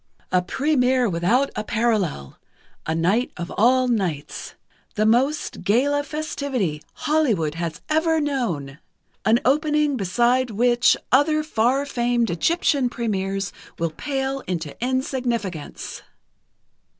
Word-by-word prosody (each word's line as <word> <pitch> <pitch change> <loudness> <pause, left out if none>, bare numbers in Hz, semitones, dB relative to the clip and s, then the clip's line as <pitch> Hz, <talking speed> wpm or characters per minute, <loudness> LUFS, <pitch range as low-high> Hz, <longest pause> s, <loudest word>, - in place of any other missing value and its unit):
"_A 180 - +3
première 260 +2 +2
without 215 +12 +2
a 215 - -2
parallel. 215 - -1 0.5
A 160 - 0
night 195 +10 +1
of 175 0 -5
all 255 +4 +4
nights. 185 - -2 0.4
The 215 - +2
most 265 +7 +1
gala 280 +7 +2
festivity 280 - -3 0.2
Hollywood 235 - +2
has 165 -1 -4
ever 320 +1 +2
known. 190 - -2 0.5
An 225 +2 +4
opening 300 +1 +2
beside 240 +6 +2
which 240 +3 +3
other 305 +4 +3
far 265 0 +1
famed 240 -4 0
Egyptian 275 - +1
premières 195 -4 -2 0.3
will 165 -1 -1
pale 270 - -2
into 165 -5 -3
insignificance. 245 - -3
240 Hz, 110 wpm, -23 LUFS, 190-275 Hz, 0.5 s, all